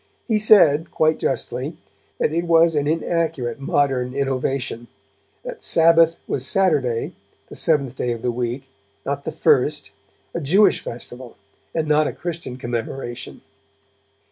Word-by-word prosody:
He 220 Hz, -3 st, +2 dB
said, 165 Hz, -7 st, +5 dB
quite 155 Hz, 0 st, +1 dB
justly, -, -, -3 dB, 0.4 s
that 150 Hz, -, 0 dB
it 170 Hz, +1 st, 0 dB
was 165 Hz, 0 st, +4 dB
an 145 Hz, -1 st, 0 dB
inaccurate 160 Hz, -6 st, -1 dB
modern 135 Hz, -2 st, 0 dB
innovation, 135 Hz, -3 st, -2 dB, 0.6 s
that -, -, -8 dB
Sabbath 165 Hz, 0 st, +4 dB
was 130 Hz, -, -2 dB
Saturday, 140 Hz, -9 st, +1 dB, 0.4 s
the -, -, -10 dB
Seventh 140 Hz, -5 st, 0 dB
day 125 Hz, -, -1 dB
of 115 Hz, 0 st, -5 dB
the 125 Hz, -, +1 dB
week, 120 Hz, +2 st, -4 dB, 0.4 s
not -, -, -3 dB
the -, -, -2 dB
first, -, -, +1 dB, 0.4 s
a 170 Hz, -, -3 dB
Jewish 190 Hz, +9 st, +4 dB
festival 120 Hz, +1 st, -9 dB, 0.4 s
and 160 Hz, -1 st, 0 dB
not 150 Hz, 0 st, +3 dB
a -, -, -4 dB
Christian 165 Hz, -7 st, -6 dB
commemoration. 120 Hz, 0 st, -5 dB
145 Hz, 135 wpm, -21 LUFS, 125-165 Hz, 0.6 s, said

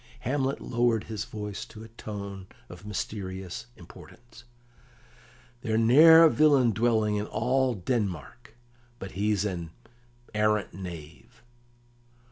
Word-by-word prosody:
Hamlet 135 Hz, +2 st, -1 dB
lowered 120 Hz, -2 st, 0 dB
his 110 Hz, -2 st, -5 dB
voice 105 Hz, -2 st, -6 dB
to 110 Hz, 0 st, -12 dB
a -, -, -10 dB
tone 100 Hz, -4 st, -8 dB, 0.2 s
of 90 Hz, +4 st, -11 dB
mysterious 95 Hz, -1 st, -5 dB
importance: 115 Hz, +5 st, -15 dB, 1.2 s
"There's 110 Hz, -1 st, 0 dB
ne'er 160 Hz, +8 st, +8 dB
a 165 Hz, -, +8 dB
villain 140 Hz, -6 st, +4 dB
dwelling 110 Hz, -1 st, +1 dB
in 105 Hz, +1 st, -3 dB
all 130 Hz, +1 st, 0 dB
Denmark 95 Hz, -, -4 dB, 0.4 s
but 95 Hz, -5 st, -8 dB
he's 105 Hz, +1 st, 0 dB
an 85 Hz, -5 st, -4 dB, 0.6 s
arrant 105 Hz, -1 st, +1 dB
knave." 85 Hz, -4 st, -10 dB
105 Hz, 110 wpm, -27 LUFS, 95-120 Hz, 1.2 s, ne'er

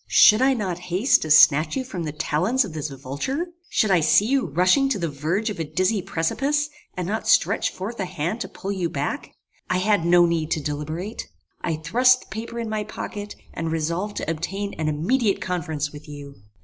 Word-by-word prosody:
Should 215 Hz, +3 st, +7 dB
I 265 Hz, 0 st, +4 dB
not 185 Hz, -6 st, -3 dB
haste 190 Hz, +10 st, +3 dB
to 155 Hz, -, -4 dB
snatch 155 Hz, 0 st, +6 dB
you 260 Hz, -, -1 dB
from 185 Hz, -10 st, -5 dB
the 150 Hz, -, -3 dB
talons 180 Hz, -, +1 dB
of 185 Hz, -, -8 dB
this 155 Hz, -1 st, -4 dB
vulture? 140 Hz, -, -4 dB, 0.2 s
Should 215 Hz, -, +2 dB
I 180 Hz, -, +5 dB
see 165 Hz, +6 st, +4 dB
you 265 Hz, -2 st, +1 dB
rushing 185 Hz, -, +3 dB
to 270 Hz, -, 0 dB
the 170 Hz, -3 st, -1 dB
verge 165 Hz, +10 st, -2 dB
of 200 Hz, -, -7 dB
a -, -, 0 dB
dizzy 185 Hz, +6 st, 0 dB
precipice, 275 Hz, -, -1 dB, 0.3 s
and 180 Hz, -1 st, -2 dB
not 220 Hz, +2 st, -3 dB
stretch 225 Hz, -, +3 dB
forth 210 Hz, +5 st, -6 dB
a 190 Hz, -, -1 dB
hand 175 Hz, +6 st, -3 dB
to -, -, -3 dB
pull 195 Hz, -, -6 dB
you 185 Hz, -4 st, -1 dB
back? 145 Hz, -2 st, -3 dB, 0.4 s
I 185 Hz, -, +2 dB
had 200 Hz, -1 st, +2 dB
no 175 Hz, +1 st, +5 dB
need 165 Hz, -2 st, 0 dB
to -, -, -1 dB
deliberate. 155 Hz, +7 st, -5 dB, 0.3 s
I 165 Hz, -, -1 dB
thrust 250 Hz, +12 st, +3 dB
the -, -, -17 dB
paper 225 Hz, +3 st, -6 dB
in 230 Hz, -1 st, -3 dB
my 215 Hz, -1 st, -2 dB
pocket, 205 Hz, 0 st, -7 dB, 0.2 s
and 165 Hz, 0 st, -3 dB
resolved 170 Hz, +6 st, -2 dB
to -, -, -3 dB
obtain 195 Hz, +5 st, -4 dB
an 155 Hz, -, -1 dB
immediate 200 Hz, -, +1 dB
conference 160 Hz, -5 st, -3 dB
with 150 Hz, +1 st, -12 dB
you. 145 Hz, -1 st, -9 dB
180 Hz, 205 wpm, -23 LUFS, 155-215 Hz, 0.4 s, Should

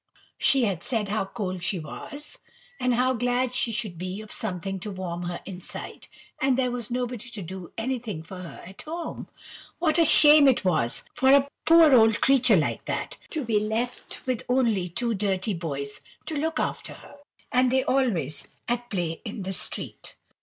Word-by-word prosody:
She 270 Hz, -2 st, +4 dB
had 190 Hz, -6 st, -2 dB
said 220 Hz, -5 st, -1 dB
how 210 Hz, -1 st, 0 dB
cold 190 Hz, -4 st, -4 dB
she 180 Hz, +2 st, +1 dB
was, 290 Hz, -, -6 dB, 0.4 s
and 250 Hz, -1 st, +1 dB
how 255 Hz, +2 st, +2 dB
glad 245 Hz, +1 st, 0 dB
she 245 Hz, -2 st, +2 dB
should 210 Hz, -7 st, -3 dB
be 185 Hz, +2 st, -4 dB
of 215 Hz, -, -11 dB
something 195 Hz, -2 st, -3 dB
to 210 Hz, -, -5 dB
warm 180 Hz, -3 st, -5 dB
her 175 Hz, 0 st, -4 dB
inside; 185 Hz, -2 st, -6 dB, 0.3 s
and 265 Hz, -1 st, +2 dB
there 255 Hz, -2 st, +1 dB
was 240 Hz, -3 st, -5 dB
nobody 245 Hz, -1 st, -3 dB
to 225 Hz, -4 st, -6 dB
do 180 Hz, 0 st, -8 dB
anything 225 Hz, -8 st, -3 dB
for 185 Hz, +3 st, -10 dB
her 180 Hz, -2 st, -9 dB
at 190 Hz, +2 st, -10 dB
home. 330 Hz, +1 st, -6 dB, 0.5 s
What 325 Hz, -1 st, +2 dB
a -, -, +7 dB
shame 295 Hz, -1 st, +8 dB
it 255 Hz, -6 st, +3 dB
was 140 Hz, -10 st, +2 dB
for 265 Hz, 0 st, +3 dB
a 280 Hz, 0 st, +6 dB, 0.2 s
poor 325 Hz, -3 st, +7 dB
old 225 Hz, -2 st, +5 dB
creature 270 Hz, -2 st, +5 dB
like -, -, -1 dB
that -, -, -4 dB
to 305 Hz, -5 st, -3 dB
be 220 Hz, -2 st, +2 dB
left 220 Hz, +4 st, -3 dB
with 255 Hz, -3 st, -1 dB
only 230 Hz, -8 st, +2 dB
two 235 Hz, +6 st, 0 dB
dirty 195 Hz, 0 st, 0 dB
boys 140 Hz, -5 st, -4 dB, 0.3 s
to 315 Hz, -, -2 dB
look 320 Hz, +3 st, -1 dB
after -, -, -2 dB
her, -, -, -15 dB, 0.3 s
and 250 Hz, 0 st, +3 dB
they 260 Hz, 0 st, +2 dB
always 190 Hz, -, 0 dB, 0.2 s
at 240 Hz, 0 st, -2 dB
play 170 Hz, -5 st, -3 dB
in 210 Hz, -2 st, -6 dB
the 190 Hz, +1 st, -4 dB
street! -, -, -3 dB
225 Hz, 180 wpm, -26 LUFS, 185-255 Hz, 0.5 s, shame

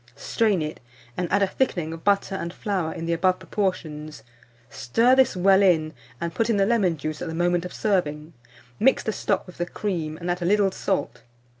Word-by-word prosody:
Strain 200 Hz, +4 st, +1 dB
it, 155 Hz, +1 st, -5 dB, 0.4 s
and 175 Hz, -2 st, -3 dB
add 200 Hz, +1 st, +3 dB
a -, -, +3 dB
thickening 175 Hz, -8 st, -1 dB
of 165 Hz, -, -9 dB
butter 200 Hz, -1 st, +2 dB
and 170 Hz, -3 st, -3 dB
flour 185 Hz, -5 st, -2 dB
in 165 Hz, -, -6 dB
the 170 Hz, -, 0 dB
above 185 Hz, +2 st, +2 dB
proportions; 155 Hz, -, -3 dB, 0.4 s
stir 230 Hz, -, +2 dB
this 260 Hz, -4 st, +4 dB
well 190 Hz, +2 st, +5 dB
in, 160 Hz, -5 st, +3 dB, 0.3 s
and 170 Hz, -1 st, -3 dB
put 225 Hz, +6 st, 0 dB
in 225 Hz, -, +2 dB
the 195 Hz, -, +3 dB
lemon 195 Hz, -7 st, +2 dB
juice 155 Hz, +1 st, -5 dB
at -, -, -3 dB
the 160 Hz, -, -4 dB
moment 175 Hz, 0 st, +1 dB
of 180 Hz, -, -6 dB
serving; 160 Hz, -6 st, -1 dB, 0.5 s
mix 265 Hz, +5 st, +3 dB
the 220 Hz, -, -2 dB
stock 200 Hz, -2 st, -1 dB
with 180 Hz, -, -14 dB
the 175 Hz, -, 0 dB
cream, 165 Hz, -6 st, -3 dB
and 175 Hz, +1 st, -3 dB
add 180 Hz, 0 st, -3 dB
a -, -, -1 dB
little 200 Hz, +1 st, +3 dB
salt. 190 Hz, +1 st, -2 dB
180 Hz, 205 wpm, -24 LUFS, 160-200 Hz, 0.5 s, well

